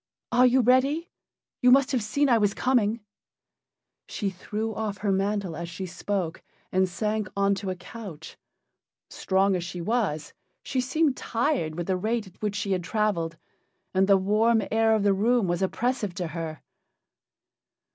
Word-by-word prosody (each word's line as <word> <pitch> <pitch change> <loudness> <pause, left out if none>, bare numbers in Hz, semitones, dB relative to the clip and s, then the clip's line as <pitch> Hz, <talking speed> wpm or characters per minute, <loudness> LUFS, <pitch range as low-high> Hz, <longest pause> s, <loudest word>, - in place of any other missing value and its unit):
Are 250 +1 +6
you 255 +1 +4
ready? 265 +7 +2 0.5
You 250 - +5
must 270 +2 +5
have 255 -3 +1
seen 280 +8 +1
I 235 -3 +4
was 205 -1 +1
coming." 235 -3 +1 1.1
She 200 -3 -3
threw 215 +4 -4
off 210 -2 -3
her 200 - +3
mantle 195 -2 -1
as 170 0 -5
she 185 +3 -5
spoke 180 -1 -3 0.3
and 185 0 +2
sank 210 +1 -2
on 200 0 +3
to 195 0 -4
a 185 - -2
couch. 180 -4 -10 0.8
Strong 190 0 +1
as 175 - -2
she 175 +1 -6
was, 180 -6 -1 0.3
she 260 - -1
seemed 275 +2 +1
tired 230 - -1
with 175 0 -3
the 185 0 0
rate 220 +3 -1
at 185 -1 -17
which 210 -1 -1
she 200 -1 -2
had 185 -2 0
traveled, 175 -4 -1 0.6
and 190 0 +3
the 200 -1 +6
warm 215 +3 +2
air 225 0 +4
of 215 - 0
the 200 -1 +4
room 225 +2 +2
was 175 +1 -1
oppressive 210 -1 -1
to 180 -2 -3
her. 160 -1 -6
205 Hz, 165 wpm, -26 LUFS, 185-230 Hz, 1.1 s, Are